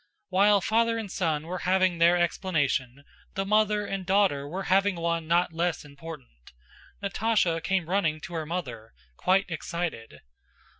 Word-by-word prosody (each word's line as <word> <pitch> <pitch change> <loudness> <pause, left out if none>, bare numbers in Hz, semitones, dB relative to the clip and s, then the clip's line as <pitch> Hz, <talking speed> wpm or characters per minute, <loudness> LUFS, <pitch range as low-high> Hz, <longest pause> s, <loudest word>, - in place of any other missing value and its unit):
While 200 +2 +4
father 230 +3 +2
and 215 -4 -5
son 160 -4 -1
were 180 +2 -4
having 185 -1 +2
their 170 +1 +5
explanation, 145 -7 -1 0.3
the 195 - -1
mother 210 0 +2
and 195 -1 -4
daughter 185 -7 +2
were 185 +6 -4
having 195 +1 +2
one 170 -1 -2
not 170 0 +2
less 170 -1 -1
important. 140 - -12 0.5
Natásha 200 -5 +1
came 190 -2 0
running 170 -5 0
to 175 - -8
her 160 -2 -3
mother, 125 -11 -5 0.2
quite 190 +2 +2
excited. 165 -7 -5
175 Hz, 145 wpm, -27 LUFS, 160-195 Hz, 0.5 s, their